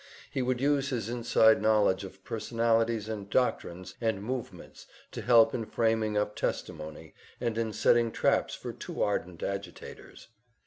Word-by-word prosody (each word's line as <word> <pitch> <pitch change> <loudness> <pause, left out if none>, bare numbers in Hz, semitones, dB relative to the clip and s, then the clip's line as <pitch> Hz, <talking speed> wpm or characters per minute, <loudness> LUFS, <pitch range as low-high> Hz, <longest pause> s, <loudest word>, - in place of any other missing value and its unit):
He 135 - -1
would 125 0 0
use 140 0 +1
his 115 -4 -3
inside 115 -2 +4
knowledge 105 -3 +3
of 95 0 -11
personalities 115 -1 0
and 105 -3 -5
doctrines 95 -6 -1
and 110 -4 -1
movements 125 +2 -6 0.2
to - - -6
help 115 -1 +5
in 115 - -2
framing 110 -2 +1
up 105 0 -1
testimony, 75 -1 -4 0.3
and 120 -2 -1
in 115 -1 -1
setting 115 +1 +3
traps - - +1
for - - -7
too - - -4
ardent 90 -4 -2
agitators. 100 +3 -7
110 Hz, 145 wpm, -29 LUFS, 100-120 Hz, 0.3 s, help